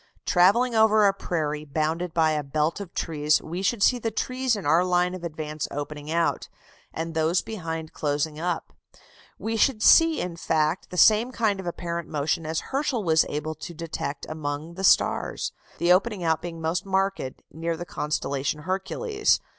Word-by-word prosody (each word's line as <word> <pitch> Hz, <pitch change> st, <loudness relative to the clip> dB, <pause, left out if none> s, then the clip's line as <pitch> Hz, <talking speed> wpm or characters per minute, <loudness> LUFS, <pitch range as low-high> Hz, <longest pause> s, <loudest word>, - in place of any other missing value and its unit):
Travelling 205 Hz, +8 st, +4 dB
over 220 Hz, -1 st, +5 dB
a 200 Hz, -, +4 dB
prairie 155 Hz, -6 st, -2 dB
bounded 160 Hz, +4 st, -2 dB
by 160 Hz, -1 st, +3 dB
a 150 Hz, -1 st, 0 dB
belt 150 Hz, +4 st, -1 dB
of 195 Hz, -4 st, -7 dB
trees, 150 Hz, -2 st, +1 dB
we 175 Hz, +4 st, -5 dB
should 200 Hz, +2 st, +1 dB
see 250 Hz, -, +4 dB
the 225 Hz, -, -1 dB
trees 255 Hz, +2 st, -1 dB
in 205 Hz, -, -6 dB
our 160 Hz, +4 st, +4 dB
line 180 Hz, 0 st, +1 dB
of 185 Hz, -2 st, -7 dB
advance 155 Hz, -2 st, -4 dB
opening 145 Hz, +1 st, -6 dB
out, 170 Hz, +1 st, 0 dB, 0.4 s
and 165 Hz, 0 st, -4 dB
those 160 Hz, +2 st, +1 dB
behind 165 Hz, -7 st, -5 dB
closing 150 Hz, +1 st, -1 dB
up; 175 Hz, 0 st, -3 dB, 0.6 s
we 225 Hz, +1 st, -3 dB
should 225 Hz, -1 st, +2 dB
see 330 Hz, -1 st, +6 dB
in 175 Hz, -2 st, -4 dB
fact 160 Hz, +1 st, 0 dB
the 180 Hz, -, -7 dB
same 220 Hz, +6 st, +5 dB
kind 215 Hz, -5 st, 0 dB
of 190 Hz, -, -6 dB
apparent 170 Hz, -1 st, -4 dB
motion 155 Hz, +1 st, -1 dB
as 160 Hz, 0 st, -1 dB
Herschel 270 Hz, -5 st, -1 dB
was 160 Hz, -2 st, +3 dB
able 150 Hz, +2 st, -3 dB
to 165 Hz, +2 st, -9 dB
detect 155 Hz, -3 st, -5 dB
among 155 Hz, +1 st, -4 dB
the 190 Hz, +2 st, -7 dB
stars: -, -, +2 dB, 0.3 s
the 175 Hz, +1 st, +4 dB
opening 200 Hz, 0 st, +1 dB
out 160 Hz, -1 st, +1 dB
being 170 Hz, -1 st, -6 dB
most 160 Hz, +2 st, -1 dB
marked 195 Hz, 0 st, 0 dB, 0.3 s
near 165 Hz, +2 st, -3 dB
the 175 Hz, -, -6 dB
constellation 150 Hz, -2 st, -2 dB
Hercules. 410 Hz, -, 0 dB
170 Hz, 175 wpm, -25 LUFS, 155-195 Hz, 0.6 s, see